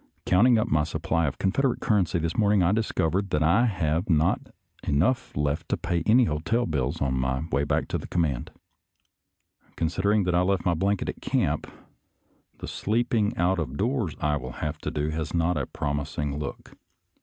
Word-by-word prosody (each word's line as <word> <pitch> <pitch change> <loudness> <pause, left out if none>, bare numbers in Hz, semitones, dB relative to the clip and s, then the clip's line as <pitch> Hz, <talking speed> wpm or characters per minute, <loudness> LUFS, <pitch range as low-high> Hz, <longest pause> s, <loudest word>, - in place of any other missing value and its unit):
Counting 115 +6 +5
up 110 - +1
my 75 0 +2
supply 80 +1 -1
of 70 - -3
Confederate 125 +7 +1
currency 95 -6 +1
this 85 0 -2
morning, 105 -3 +3
I 85 - +3
discovered 100 -3 0
that 75 -2 +1
I 95 +10 +4
have 90 -2 -1
not 80 -1 +3 0.4
enough 90 - 0
left 75 0 -1
to - - +1
pay 85 -1 -1
any 120 +4 +6
hotel 115 +7 0
bills 75 0 -1
on 65 -2 0
my 65 +2 -1
way 70 +1 +1
back - - 0
to - - -1
the - - -8
command. 75 -8 -1 1.3
Consid 85 +3 -1
ering 100 -1 +3
that 90 - 0
I 90 - +3
left 95 0 0
my 90 - +3
blanket 100 +4 0
at - - -5
camp, - - -1 0.9
the - - -7
sleep 115 +4 -1
ing 105 -2 +1
out 90 +2 +2
of 70 -4 -4
doors 115 - -1
I 75 -1 +1
will 65 -3 -7
have 75 +4 -4
to - - -3
do 75 +1 -2
has 80 +1 -3
not 85 +1 +2
a 70 -4 -2
prom 75 0 -2
ising 75 -1 -4
look. 70 -2 -6
85 Hz, 190 wpm, -26 LUFS, 75-100 Hz, 1.3 s, any